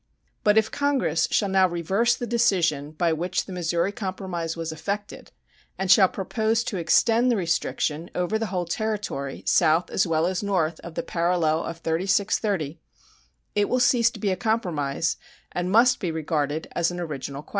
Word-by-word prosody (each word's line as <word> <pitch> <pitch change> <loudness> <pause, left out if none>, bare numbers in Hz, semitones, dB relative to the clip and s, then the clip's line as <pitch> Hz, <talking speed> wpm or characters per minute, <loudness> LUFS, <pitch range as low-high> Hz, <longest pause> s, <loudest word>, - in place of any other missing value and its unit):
But 210 0 +4
if 220 0 +3
Congress 275 - +1
shall 200 - +1
now 190 -1 +4
reverse 190 +8 +1
the 240 - -4
decision 185 -12 +1
by 165 +1 +1
which 175 +3 -2
the 190 - -8
Missouri 175 +1 0
compromise 185 -5 -4
was 165 -1 -3
effected, 200 +6 -5 0.5
and 190 -1 +1
shall 190 0 +7
propose 220 +3 -1
to 215 -4 -4
extend 230 +8 +3
the 240 - +3
restriction 165 -2 -1
over 180 +5 0
the 225 - -2
whole 180 -2 -2
territory, 200 -8 -3
south 160 +3 +3
as 185 - +1
well 160 0 +1
as 180 0 -1
north 175 -6 0
of 170 -1 -10
the - - -2
parallel 170 -2 +1
of 165 - -5
36 185 +5 +1
30', 170 -8 -2 0.7
it 205 0 +1
will 255 - +1
cease 240 -2 +4
to - - -11
be 200 -3 0
a - - +1
compromise, 175 -8 -1 0.3
and 180 0 -2
must 235 +5 +4
be 180 - -2
regarded 155 -1 -2
as 170 -1 +1
an 175 0 -5
original 140 -4 -5
question. - - -22
180 Hz, 175 wpm, -25 LUFS, 165-210 Hz, 0.7 s, shall